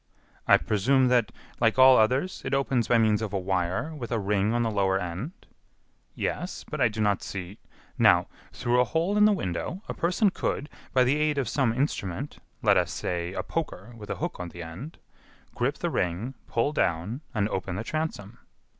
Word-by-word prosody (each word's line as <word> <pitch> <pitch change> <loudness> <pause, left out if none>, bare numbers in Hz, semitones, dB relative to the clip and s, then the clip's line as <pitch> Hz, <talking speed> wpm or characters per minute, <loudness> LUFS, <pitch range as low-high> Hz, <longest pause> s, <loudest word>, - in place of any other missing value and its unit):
"I - - +8
presume 130 +5 +2
that, 120 -4 +3 0.3
like 115 0 +3
all 130 0 +8
others, 130 +12 +2
it 135 +1 0
opens 135 -4 +1
by 120 - +4
means 110 -1 +3
of 110 -3 -4
a 100 - 0
wire 95 - -1
with 125 -6 -7
a 115 - +1
ring 105 0 +1
on 120 0 +1
the 115 - 0
lower 95 -2 +1
end." 95 - -6 0.7
"Yes, 180 - -3
but 150 -3 -4
I 125 - +6
do 110 0 -4
not 105 -2 +2
see 95 +1 -6 0.2
" - - -29
"Now, - - +6 0.3
through 120 +1 +1
a - - +5
hole 165 - 0
in 210 0 +6
the 215 - +6
window, 170 - -3
a - - -3
person 185 +4 +2
could, 150 -4 -2 0.2
by 130 - +4
the 130 +4 +2
aid 150 -1 +1
of 135 - 0
some 135 -6 +1
instrument, 120 - -2 0.2
let - - +5
us - - +1
say 85 0 -3
a - - -3
poker 120 - -4
with 105 -2 -11
a - - -1
hook - - -4
at 90 -1 -5
the 85 0 -8
end, 90 - -8 0.6
grip - - -1
the - - -2
ring, 90 +9 -1
pull 130 +6 0
down, 100 - -1
and 105 -2 +2
open 95 -2 -3
the 105 - -3
transom." 120 -9 -4
115 Hz, 200 wpm, -27 LUFS, 95-140 Hz, 0.7 s, I